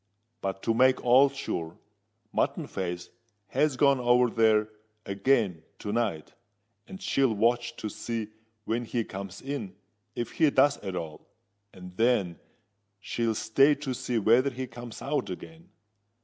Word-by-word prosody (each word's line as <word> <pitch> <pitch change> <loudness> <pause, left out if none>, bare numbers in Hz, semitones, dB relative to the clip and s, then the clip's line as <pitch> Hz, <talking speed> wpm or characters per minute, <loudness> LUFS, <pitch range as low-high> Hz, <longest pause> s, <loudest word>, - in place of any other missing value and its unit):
But 95 0 -4
to 115 - +2
make 130 +3 +3
all 130 +3 +6
sure, 85 -11 -5 0.6
Mutton - - 0
Face 90 -2 -5 0.4
has 150 -3 +1
gone 140 -1 +4
over 125 0 +4
there 110 -2 +3 0.4
again 100 -4 +1 0.2
to 105 - -5
night; 105 -9 -2 0.5
and 190 - -9
she'll 135 - +1
watch 120 +3 +1
to - - -5
see 110 +1 -4 0.4
when 120 +2 -1
he 115 0 -1
comes 100 -2 -8
in, 135 -9 -5 0.4
if 120 - -3
he 160 -2 +3
does 140 +1 +4
at 95 -2 -5
all—and 95 +2 -11
then 105 -8 +2 0.6
she'll 115 +2 -1
stay 135 +8 +4
to 140 -2 -4
see 125 -1 -2
whether 115 +6 +4
he 130 0 -5
comes 120 -1 -9
out 140 -8 -1
again. 165 - -9
115 Hz, 140 wpm, -28 LUFS, 100-130 Hz, 0.6 s, all